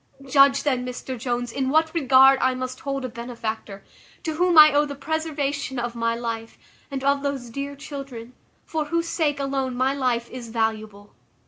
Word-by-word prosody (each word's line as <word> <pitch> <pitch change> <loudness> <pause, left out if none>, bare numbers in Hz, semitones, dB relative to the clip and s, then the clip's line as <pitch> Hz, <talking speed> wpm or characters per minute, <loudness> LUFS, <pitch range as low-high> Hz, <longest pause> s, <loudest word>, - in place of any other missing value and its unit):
Judge, 275 0 +5
then, 260 -4 0
Mr 250 +1 -5
Jones, 245 0 -3
in 265 +1 -1
what 315 +2 +2
regard 270 -3 +6
I 260 0 +2
must 255 0 -5
hold 275 -1 -3
a - - -1
benefactor, 225 -4 -6 0.4
to 320 - -2
whom 350 +1 +2
I 305 -1 +10
owe 290 +1 +4
the 285 - -6
preservation 285 -2 -3
of 240 0 -2
my 230 0 -1
life, 230 -1 -5 0.3
and 275 -1 -5
of 280 0 +2
those 275 -4 -3
dear 280 +3 -5
children, 275 -4 -8 0.3
for 315 -2 -2
whose 335 +2 -1
sake 300 -4 0
alone 270 -2 -2
my 260 +2 +1
life 250 -4 0
is 245 -2 -8
valuable. 220 -2 -3
265 Hz, 180 wpm, -24 LUFS, 240-285 Hz, 0.4 s, I